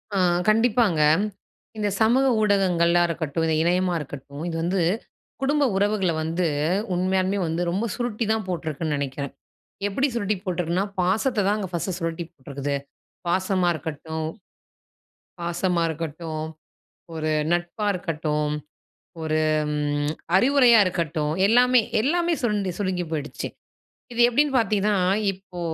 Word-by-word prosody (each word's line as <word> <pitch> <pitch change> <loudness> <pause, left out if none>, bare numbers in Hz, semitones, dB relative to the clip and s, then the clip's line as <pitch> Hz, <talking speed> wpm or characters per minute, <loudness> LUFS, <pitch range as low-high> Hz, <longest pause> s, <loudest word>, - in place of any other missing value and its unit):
ஆ, - - +2 0.3
கண்டிப்பாங்க. 225 -6 +3 0.8
இந்த 210 -1 0
சமூக 245 +5 +4 0.2
ஊடகங்களா 180 -4 +3
இருக்கட்டும், 165 -1 -2
இந்த 160 - +2
இணையமா 180 +1 +2
இருக்கட்டும், 140 0 -8
இது 170 - -3
வந்து 180 +1 +1 0.6
குடும்ப 290 +2 +2
உறவுகள 200 -2 +2
வந்து 165 +3 -1 0.5
உண்மையாலுமே 185 +2 +1
வந்து 165 +2 -1
ரொம்ப 200 +6 -1
சுருட்டி 240 -2 -2
தான் 220 -2 -2
போட்ருக்குன் 160 -3 -2
நெனைக்கிறேன். 140 -1 -4 0.5
எப்படி 265 +8 +1
சுருட்டி 210 -2 0
போட்ருக்குன்னா, 180 +1 0
பாசத்த 210 +5 +1
தாங்க 210 -1 0
ஃபர்ஸ்ட் 175 +1 -2
சுருட்டி 165 0 -3
போட்ருக்குது. 140 -1 -4 0.5
பாசமா 185 0 +1
இருக்கட்டும் 160 +1 -5 1.1
பாசமா 170 0 0
இருக்கட்டும், 160 0 -4 0.7
ஒரு 155 -1 -2 0.2
நட்பா 175 +4 -1
இருக்கட்டும், 155 -4 -1 0.7
ஒரு 155 0 0 0.3
ம் 145 0 0 0.2
அறிவுரையா 250 +1 +6
இருக்கட்டும், 160 -4 -1
எல்லாமே 245 +3 +5 0.2
எல்லாமே 340 +7 +1
சுருண்டு 210 -5 0
சுருங்கி 185 -3 -1
போயிடுச்சு. 150 -2 -4 0.7
இது 240 - +1
எப்டின்னு 280 +3 +2
பாத்தீங்கன்னா, 210 -1 +1 0.4
இப்போ 185 -1 -11
180 Hz, 115 wpm, -24 LUFS, 160-210 Hz, 1.1 s, அறிவுரையா